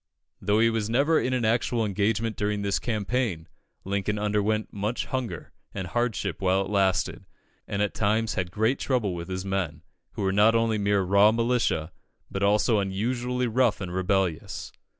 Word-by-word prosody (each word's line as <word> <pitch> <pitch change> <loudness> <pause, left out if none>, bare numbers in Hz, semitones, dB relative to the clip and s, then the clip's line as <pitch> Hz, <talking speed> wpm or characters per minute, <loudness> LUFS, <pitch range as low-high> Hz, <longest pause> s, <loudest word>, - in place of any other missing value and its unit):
Though 105 +1 +2
he 115 0 +4
was 110 -2 -1
never 140 +7 +3
in 130 - -1
an 125 -3 0
actual 115 0 +1
engagement 105 +2 0
during 105 0 -1
this 100 -1 0
campaign, 110 -6 -2 0.4
Lincoln 100 +2 -1
underwent 105 +1 0
much 105 +4 -2
hunger 120 -11 -4 0.2
and 95 -2 -3
hardship 115 +5 -2
while 95 0 +2
it 95 - -7
lasted, 95 -3 +1 0.4
and 100 +1 0
at 105 - -1
times 110 +1 +1
had 90 -1 -2
great 110 +8 0
trouble 120 -8 0
with 85 -1 -6
his 95 0 -4
men, 90 -5 -2 0.3
who - - -4
were 95 - +2
not 105 +3 +5
only 115 -2 +2
mere 100 -1 +2
raw 100 +3 +5
militia, 115 -8 0 0.4
but 100 - -3
also 105 +2 +3
unusually 120 +6 -1
rough 120 -1 +2
and 90 -3 -5
rebellious. 95 -2 -1
105 Hz, 170 wpm, -26 LUFS, 95-115 Hz, 0.4 s, not